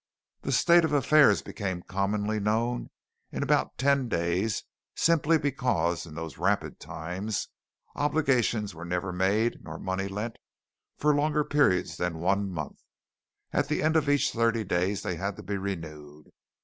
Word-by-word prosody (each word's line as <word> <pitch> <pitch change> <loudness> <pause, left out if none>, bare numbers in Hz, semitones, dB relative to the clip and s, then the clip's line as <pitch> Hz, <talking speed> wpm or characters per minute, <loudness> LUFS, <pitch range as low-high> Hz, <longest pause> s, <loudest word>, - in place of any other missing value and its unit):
The - - -3
state 170 0 +5
of 160 -2 0
affairs 145 +1 +5
became 95 -4 -4
commonly 105 +2 -1
known 115 +4 0 0.4
in - - -2
about - - +1
ten 135 -1 +2
days 90 +4 0 0.3
simply 165 -1 +3
because, 125 - 0
in 75 - -11
those 80 -1 -7
rapid - - 0
times, 95 +6 -4 0.5
obligations 130 -8 +1
were 85 +1 -9
never 90 +2 -2
made 100 +6 +1
nor 80 0 -7
money 95 +2 -2
lent 105 +4 -4 0.6
for 150 0 +3
longer 150 +1 +2
periods 140 -12 +2
than 90 -2 -2
one 100 +4 +1
month. 80 -5 -6 0.7
At - - +1
the - - -1
end 155 +1 +2
of 150 -3 +2
each 145 -1 +3
thirty 115 -1 +1
days 95 +1 0
they 95 -5 -2
had 100 +2 -3
to - - -10
be 100 +2 -3
renewed. 75 -6 -7
105 Hz, 150 wpm, -28 LUFS, 90-135 Hz, 0.7 s, state